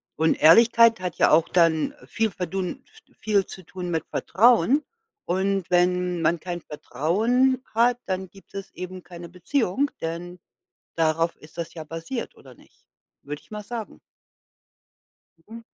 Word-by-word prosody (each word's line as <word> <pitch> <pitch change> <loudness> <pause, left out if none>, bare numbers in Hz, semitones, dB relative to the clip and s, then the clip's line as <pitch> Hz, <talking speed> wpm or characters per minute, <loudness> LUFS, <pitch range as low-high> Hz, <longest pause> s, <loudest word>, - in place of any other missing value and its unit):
Und 160 +1 +2
Ehrlichkeit 230 +6 +6
hat 180 -3 -3
ja - - +4
auch 160 +1 +4
dann 165 - +2
viel 225 -1 0
verdun 185 - -4
v 440 +1 -23
viel 205 -3 +1
zu 185 - -10
tun 180 +1 -7
mit 160 -1 -1
Vertrauen, 240 - +3 0.4
und 190 0 -1
wenn 180 -1 +2
man 165 +1 +2
kein 175 -1 -5
Vertrauen 235 - 0
hat, 240 +2 +3
dann 190 -1 -3
gibt 195 +1 -19
es 195 -1 -7
eben 185 0 -7
keine 175 -1 -10
Beziehung, 225 - 0
denn 175 +2 -5 0.6
darauf 165 +1 +1
ist 155 +2 -17
das 170 - -5
ja 160 -2 -7
basiert, 165 - -6
oder 130 -2 -15
nicht? - - -24 0.4
Würde 145 +1 -7
ich - - -27
mal 210 0 -5
sagen. 230 -2 -7 1.4
Mhm. 225 +7 -12
180 Hz, 150 wpm, -24 LUFS, 165-225 Hz, 1.4 s, Ehrlichkeit